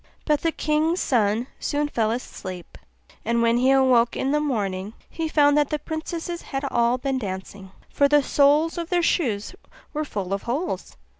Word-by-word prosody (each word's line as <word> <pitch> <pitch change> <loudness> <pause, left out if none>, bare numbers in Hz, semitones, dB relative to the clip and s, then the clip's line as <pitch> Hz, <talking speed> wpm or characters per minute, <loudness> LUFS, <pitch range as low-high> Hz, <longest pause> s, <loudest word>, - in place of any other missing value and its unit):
But 300 -2 +2
the 330 - +1
king's 315 +3 0
son 225 -1 +1
soon 290 0 -1
fell 225 -6 0
asleep; 185 -7 -6 0.5
and 235 +1 +1
when 230 0 +3
he 255 +2 +3
awoke 255 -3 +4
in 270 - -1
the 300 - +2
morning 205 -8 -2
he 325 -1 -4
found 290 -2 +4
that 290 - +1
the 300 - 0
princesses 325 +3 -5
had 270 +1 -4
all 235 +1 +2
been 265 0 -2
dancing, 190 -2 -6 0.2
for 280 - +2
the 295 0 +4
soles 295 +5 +3
of 335 0 -5
their 350 -1 +1
shoes 235 - 0 0.4
were 305 0 -1
full 200 -9 -4
of 195 - -2
holes. 285 +10 -3
270 Hz, 175 wpm, -24 LUFS, 225-300 Hz, 0.5 s, awoke